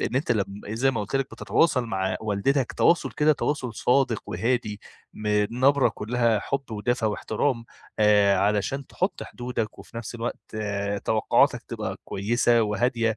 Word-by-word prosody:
إن 125 - -1
أنتَ 140 - +1
لم 105 -4 +1 0.2
زي 120 +5 +1
ما 115 -5 -2
قُلت 105 +5 -2
لك 135 -1 -2
بتتواصل 140 -7 +1
مع 95 -4 -1
والدتك 110 +6 0
تواصل 170 - +3
كده 150 +1 +3
تواصل 135 -5 -2
صادق 125 -2 +2
وهادي، 105 +1 -1 0.3
من 105 -1 +1
نبرة 140 -1 +5
كلّها 115 0 0
حب 135 0 -3
ودفى 110 +2 -1
واحترام، 115 +3 -1 0.3
آآ 105 -2 +5
علشان 105 +7 0
تحط - - -2
حدودك 120 -3 -4
وفي 115 - -12
نفْس 115 0 -6
الوقت 115 -2 -6 0.5
توقعاتك 110 -1 +2
تبقى - - -4
كويسة 115 +3 +2
وهادية، 115 +2 0
115 Hz, 145 wpm, -25 LUFS, 105-125 Hz, 0.5 s, نبرة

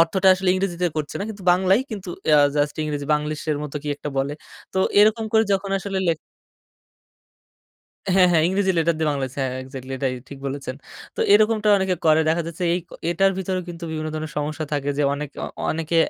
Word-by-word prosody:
অর্থটা 185 +3 +3
আসলে 190 0 -2
ইংরেজিতে 180 -2 -1
করছে 150 -2 -3
না 200 - -2
কিন্তু 200 -3 -8
বাংলায় 190 +5 +3
কিন্তু 195 -4 -6 0.3
আ - - +6 0.2
জাস্ট 145 0 +1
ইংরেজি 145 -2 -3
বাংলিশ 150 0 -2
এর 145 - 0
মতো 150 0 -6
কি 150 - -5
একটা 150 - -6
বলে। 140 +2 0 0.4
তো 190 - -1 0.2
এরকম 220 +2 +4
করে 220 0 +5
যখন 195 0 -1
আসলে 195 0 -3
লেখ 165 - +2 2.0
হ্যাঁ, 185 -1 +6
হ্যাঁ 160 -2 +4
ইংরেজি 190 0 +1
লেটার 165 0 +2
দিয়ে 155 -1 +1
বাংলা 140 -2 -1
আছে। 135 - -12
হ্যাঁ 130 0 -3
এক্সাক্টলি 130 0 -8
এটাই 130 -1 -1
ঠিক 140 - -9
বলেছেন। 135 -1 -4 0.4
তো - - -3
এরকমটা 215 0 +4
অনেকে 190 -1 +1
করে। 155 0 +5
দেখা 165 +2 +2
যাচ্ছে 170 +2 -6
এই - - +1 0.3
এটার 195 +3 +3
ভিতরেও 185 -1 -2
কিন্তু 170 0 -7
বিভিন্ন 155 0 -3
ধরনের 155 0 -4
সমস্যা 150 +2 -3
থাকে 145 -1 0
যে - - +3
অনেকে, 145 0 -6 0.3
অনেকে 165 +1 -1
165 Hz, 195 wpm, -23 LUFS, 150-190 Hz, 2.0 s, আ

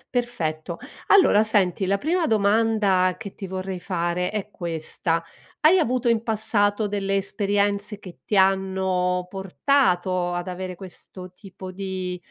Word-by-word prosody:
Perfetto, 170 -9 -2 0.3
allora 295 - +6
senti 195 -3 +1
la 200 +2 +1
prima 330 - 0
domanda 205 - +2
che 200 -3 -8
ti 195 - -7
vorrei 185 -1 -5
fare 180 0 -1
è 210 -1 -4
questa: 165 -1 -2 0.4
hai 335 +5 +6
avuto 250 -6 +1
in 230 -1 +2
passato 215 -2 +1
delle 195 -1 -1
esperienze 200 +1 0
che 180 -4 -12
ti 205 - 0
hanno 190 -1 +1
portato 185 -3 +1
ad 175 +1 -3
avere 185 0 -5
questo 185 0 -10
tipo 185 -1 -10
di, 185 -1 -4
195 Hz, 130 wpm, -24 LUFS, 180-210 Hz, 0.4 s, allora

